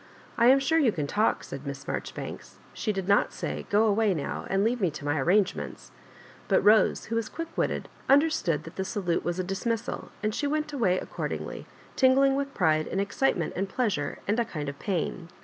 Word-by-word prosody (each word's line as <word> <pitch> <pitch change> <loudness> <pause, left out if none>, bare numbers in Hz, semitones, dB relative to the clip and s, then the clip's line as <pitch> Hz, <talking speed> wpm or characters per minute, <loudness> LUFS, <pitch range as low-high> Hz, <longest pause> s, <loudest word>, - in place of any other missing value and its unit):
" - - -23
I 235 - +6
am 265 +2 +8
sure 320 +4 +2
you 265 -7 +4
can 155 -7 -2
talk," 210 +9 +1
said - - -7
Miss - - -6
Marjo - - -3
ribanks. - - -7 0.2
She 215 - -1
did 195 -2 -3
not 200 0 +3
say - - -5
" - - -21
Qo 210 +2 +4
away 210 -2 +2
now, 145 - -4
and 195 +1 +2
leave 235 +2 0
me 185 - +3
to 150 -1 -8
my 145 +1 +1
arrangements; 190 +6 0 0.3
" - - -22
but - - +2
Bose, 215 +1 +5
who 230 - -3
was 230 -1 -1
qaick 330 0 -7
witted, - - -1 0.2
understood 270 - +3
that 165 - -11
the 190 - 0
salute 190 -4 -1
was 175 0 -2
a 185 - -1
dismissal, 220 +5 -3
and 215 0 0
she 290 - -1
went 305 +1 -1
away 210 -10 +2
accordingly, - - -5 0.3
tingling 270 +1 +4
with 275 0 -2
pride 155 -4 +2
and 190 - -2
excitement 200 -2 0
and 195 +1 -2
plea 240 +1 0
sure 145 -5 -3
and 210 +4 +1
a - - +3
kind 150 -8 -4
of 140 - -9
pain. 180 -2 -2
205 Hz, 220 wpm, -27 LUFS, 180-250 Hz, 0.3 s, am